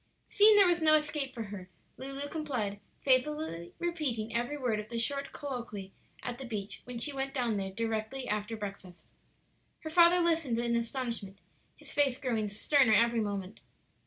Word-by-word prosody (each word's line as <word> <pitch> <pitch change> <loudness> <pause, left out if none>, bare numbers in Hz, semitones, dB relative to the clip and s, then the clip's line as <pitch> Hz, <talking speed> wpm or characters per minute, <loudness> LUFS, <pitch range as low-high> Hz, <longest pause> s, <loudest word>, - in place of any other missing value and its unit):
Seeing 425 +1 +7
there 405 -1 +7
was 350 -1 +2
no 310 -1 +6
escape 300 -3 0
for 235 -3 -5
her, 195 -3 -8 0.3
Lulu 275 +2 -5
complied, 255 -11 -3 0.2
faithfully 260 - +1
repeating 275 -11 -2
every 240 +5 -1
word 240 -6 0
of 210 0 -7
the 235 - -4
short 275 +5 -1
colloquy 235 -8 -6 0.3
at 245 0 -4
the 265 - -6
beach 210 -4 -5
when 250 -1 -6
she 285 +5 -2
went 270 0 -3
down 240 -5 +1
there 195 -1 -2
directly 225 +5 -3
after 210 +2 -2
breakfast. 195 -3 -8 0.7
Her 315 - -6
father 345 +1 +6
listened 325 -8 +2
in 235 0 0
astonishment, 235 -4 -3 0.4
his - - -11
face 275 -3 +2
growing 230 -6 -1
sterner 235 +4 +3
every 235 +1 +4
moment. 200 -2 -3
240 Hz, 165 wpm, -31 LUFS, 215-285 Hz, 0.7 s, Seeing